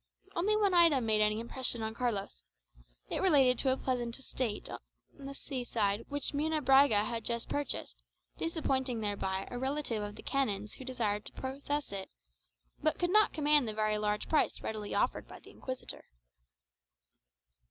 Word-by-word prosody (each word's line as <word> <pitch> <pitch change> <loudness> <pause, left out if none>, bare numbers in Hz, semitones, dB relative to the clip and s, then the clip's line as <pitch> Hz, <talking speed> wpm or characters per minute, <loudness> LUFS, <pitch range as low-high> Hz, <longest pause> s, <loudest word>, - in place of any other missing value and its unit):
Only 415 +5 +2
one 405 -3 +3
item 330 -8 +6
made 215 -1 +3
any 210 +1 +2
impression 235 0 -2
upon 220 0 -3
Carlos: 215 - -2 0.7
it - - -1
related 270 -9 +5
to 265 - +3
a 260 - +1
pleasant 245 -3 -2
estate 255 -5 -3
by - - -6 0.4
the 275 0 -6
sea 270 -3 -5
side 210 -2 0
which 285 -1 -2
Munebrãga 280 -7 +4
had 230 0 -3
just 235 0 -2
purchased, 290 0 -3 0.3
disappointing 265 -7 -1
thereby 195 -2 -2
a 245 - -4
relative 265 -4 -1
of 205 0 -5
the - - -11
canon's 210 -7 -1
who 260 - -9
desired 220 -5 -1
to - - -8
possess 280 +1 -3
it, 195 -1 -5 0.7
but 310 +1 +1
could 350 0 0
not 425 +1 +5
command 295 -4 +4
the 215 - -3
very 215 0 +1
large 210 0 -1
price 310 - +1
readily 215 -2 -4
offered - - 0
by - - -11
the - - -15
Inquisitor. 260 -1 -7
255 Hz, 165 wpm, -32 LUFS, 215-285 Hz, 0.7 s, item